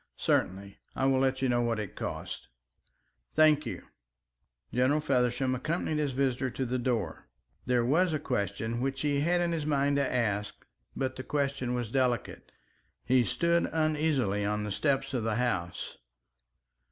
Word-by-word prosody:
"Certainly. 100 +2 0 0.2
I 135 - 0
will 135 -1 +3
let 130 0 +1
you - - +3
know 120 0 +2
what 115 -2 0
it 105 -4 -5
costs." - - -5 0.9
"Thank 155 -1 +5
you." - - -5 0.9
General 130 +5 +3
Feversham 130 -2 +1
accompanied 155 +3 -1
his 145 -3 0
visitor 130 -1 0
to 130 +2 -3
the 125 +1 -1
door. 115 -9 -2 0.4
There 125 -2 +2
was 165 +8 +3
a 155 - +1
question 115 -3 -2
which 135 0 -2
he 145 -1 +1
had 175 +4 +2
it - - +3
in 170 - 0
his 155 -3 -2
mind 140 -1 +2
to 140 -2 +1
ask, 105 -4 -1 0.3
but 130 -1 -2
the 130 - -5
question 140 -4 -1
was 120 -3 -3
delicate. 125 -3 -1 0.5
He 125 0 +4
stood 170 +7 +1
uneasily 150 -10 +1
on 105 +1 -1
the 105 - -4
steps 135 +4 0
of 125 - 0
the 110 -1 0
house. 105 -8 -2
130 Hz, 165 wpm, -30 LUFS, 120-145 Hz, 0.9 s, Thank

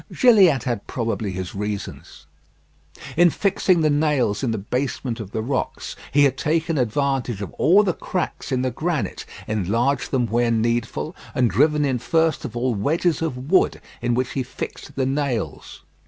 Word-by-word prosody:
Gilliatt 190 - +5
had 120 -5 -3
probably 115 -4 -2
his 95 -1 -5
reasons. 105 0 -6 0.9
In 175 +1 +6
fixing 185 -1 +2
the 155 - +3
nails 145 -8 +1
in 130 - 0
the 110 - -1
basement 125 +2 -3
of 105 -4 -6
the 110 +1 -3
rocks, 130 +2 -3 0.2
he 145 +1 +5
had 135 -1 +2
taken 160 0 0
advantage 125 -2 0
of 100 -4 -6
all 200 +5 +6
the 185 -4 +1
cracks 180 -4 -4
in 130 -1 +1
the 130 - 0
granite, 150 - -3 0.2
enlarged 110 +7 0
them 125 -3 +1
where 120 +2 +1
needful, 115 +7 -1 0.2
and 125 -5 +2
driven 150 - +3
in 130 -3 0
first 160 +5 +1
of 120 - -6
all 125 +1 +1
wedges 155 - 0
of 135 -3 -4
wood, 190 - +3 0.2
in 120 0 +1
which 130 +1 -1
he 135 - -1
fixed 125 - -7
the 135 - 0
nails. 130 - -3
130 Hz, 170 wpm, -22 LUFS, 115-150 Hz, 0.9 s, In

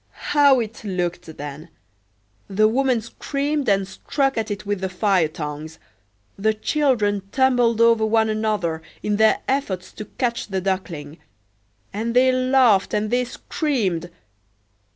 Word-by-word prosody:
How 285 -3 +5
it 225 -1 -5
looked 175 -4 -3
then! 145 +3 -8 0.8
The 215 +2 +3
woman 255 0 +1
screamed, 280 +4 -2
and 195 -1 +2
struck 270 +8 -1
at 225 -1 -2
it 205 0 -5
with 205 -2 -2
the 190 - -2
fire 185 -3 +2
tongs; 155 +1 -7 0.6
the 215 +2 +1
children 215 -5 +1
tumbled 245 -4 +2
over 230 -1 +5
one 220 0 +3
another 215 -7 -1 0.2
in 210 -1 0
their 220 0 +4
efforts 265 -9 -2
to 215 - -7
catch 240 -1 -2
the 195 -2 -2
Duckling; 175 -6 -4 0.7
and 230 +3 -3
they 255 +1 +5
laughed 255 -6 +3
and 210 +1 -1
they 250 +1 +2
screamed! 220 - -2
215 Hz, 135 wpm, -22 LUFS, 190-250 Hz, 0.8 s, How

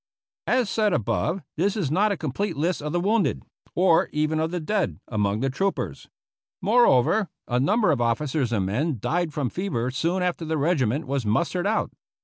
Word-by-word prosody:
As 250 -2 +2
said 210 0 +1
above, 175 - -1
this 195 +6 +1
is 160 -10 -1
not 205 +6 +3
a 200 - -1
complete 160 +5 -3
list 170 +3 0
of 150 +1 -4
the 175 - 0
wounded, 205 +3 +1 0.3
or 175 -2 +4
even 155 +1 0
of 160 +1 0
the 180 +1 -3
dead, 195 +3 -1
among 105 -1 0
the 135 - +1
troopers. 195 +8 -2 0.5
Moreover, 205 - +3 0.2
a 125 0 +1
number 205 - +3
of 135 -5 0
officers 125 +2 0
and 100 -5 0
men 130 - -1
died 170 - -1
from 140 -5 -2
fever 130 -10 -2
soon 170 +7 0
after 180 -2 -1
the 160 0 -1
regiment 145 -3 +1
was 135 -1 -1
mustered 170 - 0
out. 215 +1 0
160 Hz, 180 wpm, -25 LUFS, 130-190 Hz, 0.5 s, or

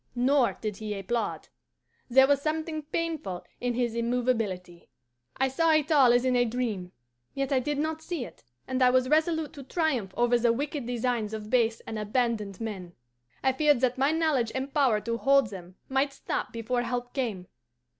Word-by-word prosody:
Nor 255 +1 +2
did 210 -3 -3
he 210 -2 -4
applaud. 230 +5 -3 0.6
There 265 +2 +7
was 280 0 +2
something 310 +1 -2
painful 305 - -3
in 245 -1 -1
his 240 -2 0
immovability. 230 -7 -2 0.5
"I 265 - +2
saw 320 +5 +2
it 310 +1 +2
all 270 -5 +6
as 245 +1 +3
in 255 -1 +2
a 245 - +4
dream, 225 -7 -3 0.4
yet 275 0 -2
I 265 - +3
did 290 +3 -2 0.2
see 320 -6 -4
it, - - -14 0.2
and 260 0 -2
I 250 - +6
was 255 0 +2
resolute 315 0 +1
to 285 - -9
triumph 265 - -1
over 240 0 +3
the 235 -1 +3
wicked 285 0 -3
designs 235 -3 -1
of 215 0 -8
base 230 -3 +2
and 220 -1 -6
abandoned 210 -2 -1
men. 195 -6 -6 0.5
I 265 - +3
feared 295 -1 +3
that 255 0 +1
my 275 +3 +3
knowledge 310 -8 +1
and 265 +1 -3
power 260 -8 +3
to 230 +2 -3
hold 275 -5 +3
them 180 -2 -10
might 270 +1 0
stop - - -3
before 235 +2 -1
help 245 0 -3
came. 220 -9 -2
250 Hz, 180 wpm, -28 LUFS, 225-275 Hz, 0.6 s, There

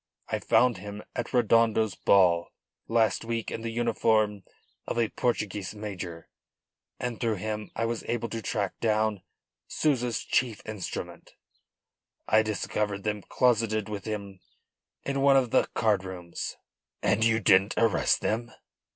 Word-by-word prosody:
I - - -1
found 125 -3 +3
him 105 +2 -8
at 120 - -3
Redondo's 115 -3 +3
ball 90 -3 +3 0.4
last 115 -3 +2
week 115 -1 -3
in 115 - -4
the 115 - -3
uniform 110 -3 +1 0.5
of - - -3
a 115 -2 +2
Portuguese 105 -4 -2
major, 90 -5 -6 0.7
and 120 -2 -3
through 115 -3 0
him 105 +2 -4
I 115 - 0
was 115 0 -2
able 120 -1 -1
to 115 - -4
track 100 -3 -2
down 110 -3 +1 0.5
Souza's 125 -7 0
chief 120 -5 0
instrument 105 -5 -6 0.9
I 110 - +5
discovered 105 -1 -2
them 105 -1 -2
closeted 110 -1 +1
with 100 -2 -5
him 100 -3 -5 0.6
in 140 0 -1
one 135 0 +6
of 125 -3 +1
the - - +3
card 105 -4 +2
rooms." 90 -2 -6 0.5
"And 110 - +2
you 115 0 +3
didn't 100 -1 +4
arrest 115 -4 +3
them?" 115 +2 -1
110 Hz, 140 wpm, -28 LUFS, 100-115 Hz, 0.9 s, one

